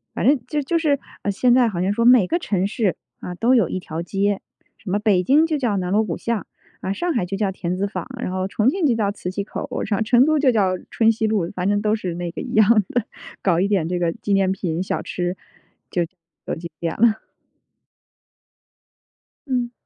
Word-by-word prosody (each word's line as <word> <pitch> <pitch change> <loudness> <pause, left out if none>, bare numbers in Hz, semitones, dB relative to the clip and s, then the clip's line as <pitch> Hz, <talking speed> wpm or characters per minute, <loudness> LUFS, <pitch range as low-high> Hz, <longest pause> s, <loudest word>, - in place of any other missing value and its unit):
反 - - -1
正 285 0 +5
就 300 +1 -1
就 335 +5 0
是 290 -4 +2 0.3
现 240 +5 +3
在 250 -2 +5
好 180 -5 -2
像 190 +2 +1
说 230 +2 +1
每 245 -5 +7
个 340 - 0
城 195 - 0
市， 205 -3 0 0.2
啊， 180 - -6
都 245 +7 +3
有 220 -8 +4
一 185 - -3
条 165 -2 -5
街， 200 +3 0 0.4
什 210 - -9
么 205 +3 +1
北 205 -4 +3
京 290 - +4
就 315 -2 0
叫 240 -7 0
“南 180 -1 -2
锣 215 +2 +3
鼓 170 - -3
巷”， 230 -3 -3 0.3
啊 190 - -2
上 350 - -1
海 225 -8 0
就 195 +2 -4
叫 200 -1 0
“田 180 -1 -3
子 200 +2 -1
坊”， 210 - -5
然 185 - -2
后 185 0 -1
重 215 +5 +2
庆 355 +1 0
就 245 -5 +3
叫 205 -3 0
“磁 180 -3 -6
器 200 +2 -3
口”， - - -6 0.4
成 245 +3 +5
都 310 0 +2
就 275 -3 +4
叫 190 -5 +2
“春 225 -1 +3
熙 220 0 -1
路”。 200 -6 0
反 180 0 -2
正 205 0 +1
都 215 0 +1
是 185 -5 -4
那 175 -1 -4
个 - - -6
一 - - -6
样 215 0 +5 0.2
的， 245 -3 0 0.4
搞 175 -3 +2
一 195 - +2
点 185 -6 +1
这 180 0 -1
个 170 -1 0
纪 215 -3 -5
念 195 -1 +3
品、 175 -3 -2
小 190 - -2
吃， 180 0 -3 0.6
就 175 - +1 0.4
有 - - -2
景 170 +1 -7
点 165 -1 -2
了。 220 -1 +2 2.2
嗯。 245 -2 -1
205 Hz, 240 characters per minute, -22 LUFS, 185-240 Hz, 2.2 s, 每